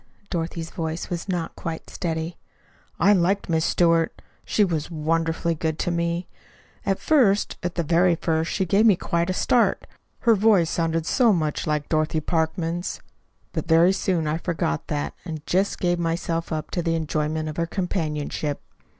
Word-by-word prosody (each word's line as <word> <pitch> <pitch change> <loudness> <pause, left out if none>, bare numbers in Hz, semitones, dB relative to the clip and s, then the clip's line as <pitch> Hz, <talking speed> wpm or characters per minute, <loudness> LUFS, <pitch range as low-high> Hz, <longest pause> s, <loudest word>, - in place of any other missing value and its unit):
Dorothy's 165 -1 -3
voice 165 +1 -4
was 175 +2 -4
not 175 -3 -2
quite 165 -1 -5
steady. 165 -1 -4 0.6
"I 195 +5 +6
liked 195 +1 +1
Miss 160 -1 +2
Stewart. 165 -2 +2 0.2
She 210 - +2
was 165 -5 -1
wonderfully 165 +1 0
good 160 -1 -2
to 175 - -1
me. 170 +1 -1 0.6
At 195 -1 +2
first 230 -10 +3
at 175 0 -3
the 170 - 0
very 170 +2 +3
first 160 0 -1
she 190 - 0
gave 200 +6 +4
me 205 - +6
quite 170 0 -1
a - - +1
start. 235 +5 +2 0.4
Her 235 - +5
voice 200 -5 +4
sounded 165 -1 0
so 235 +5 +4
much 155 -2 -1
like 150 -1 0
Dorothy 155 0 +1
Parkman's. 165 +2 -1 0.5
But - - -3
very 165 +3 +5
soon 185 -4 0
I 155 +2 -1
forgot 165 - -2
that, 75 0 -2
and 160 -4 -6
just 190 +3 +1
gave 175 -1 +1
myself 165 0 -2
up 155 -1 -3
to 175 - -1
the 165 -1 0
enjoyment 155 0 -1
of 155 - -6
her 170 0 0
companionship. 155 -5 -2
165 Hz, 165 wpm, -24 LUFS, 160-180 Hz, 0.6 s, I